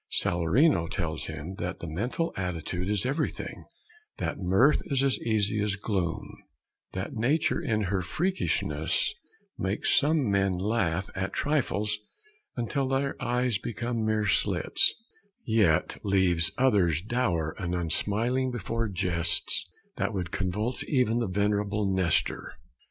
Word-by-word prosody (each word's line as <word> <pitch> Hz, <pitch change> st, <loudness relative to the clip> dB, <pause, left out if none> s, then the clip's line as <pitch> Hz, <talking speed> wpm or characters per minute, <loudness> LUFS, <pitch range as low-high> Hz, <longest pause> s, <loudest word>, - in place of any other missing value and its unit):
Salarino 85 Hz, -, +2 dB
tells 85 Hz, -5 st, -3 dB
him 80 Hz, +3 st, -6 dB
that 90 Hz, -, -3 dB
the -, -, -6 dB
mental 115 Hz, -, -2 dB
attitude 90 Hz, 0 st, -3 dB
is 105 Hz, 0 st, +1 dB
everything; 145 Hz, +5 st, -3 dB, 0.5 s
that -, -, -3 dB
mirth 95 Hz, +11 st, +4 dB
is 135 Hz, -2 st, +1 dB
as 135 Hz, -1 st, +2 dB
easy 105 Hz, -2 st, +1 dB
as 105 Hz, -1 st, 0 dB
gloom; 95 Hz, -5 st, -3 dB, 0.5 s
that 95 Hz, +7 st, -4 dB
nature 135 Hz, +8 st, +1 dB
in 110 Hz, -9 st, 0 dB
her 95 Hz, -1 st, 0 dB
freakishness 180 Hz, -, 0 dB, 0.5 s
makes -, -, 0 dB
some 150 Hz, -2 st, +3 dB
men 95 Hz, -2 st, +2 dB
laugh 95 Hz, -3 st, 0 dB
at 95 Hz, +1 st, -3 dB
trifles 105 Hz, -8 st, 0 dB, 0.6 s
until 130 Hz, +3 st, -1 dB
their 135 Hz, +1 st, 0 dB
eyes 125 Hz, -3 st, +1 dB
become 120 Hz, 0 st, -3 dB
mere 110 Hz, -1 st, +1 dB
slits, 100 Hz, -, +2 dB, 0.5 s
yet 105 Hz, -9 st, +2 dB
leaves 95 Hz, -4 st, +2 dB
others 95 Hz, -, +3 dB
dour 95 Hz, -9 st, 0 dB
and 90 Hz, -2 st, -2 dB
unsmiling 110 Hz, +9 st, 0 dB
before 115 Hz, -1 st, -2 dB
jests 90 Hz, -3 st, +1 dB, 0.3 s
that -, -, -1 dB
would 90 Hz, -3 st, -3 dB
convulse 105 Hz, +6 st, -1 dB
even 125 Hz, -4 st, +2 dB
the 115 Hz, -, 0 dB
venerable 105 Hz, +2 st, 0 dB
Nestor. 95 Hz, -3 st, +1 dB
105 Hz, 125 wpm, -28 LUFS, 90-120 Hz, 0.6 s, mirth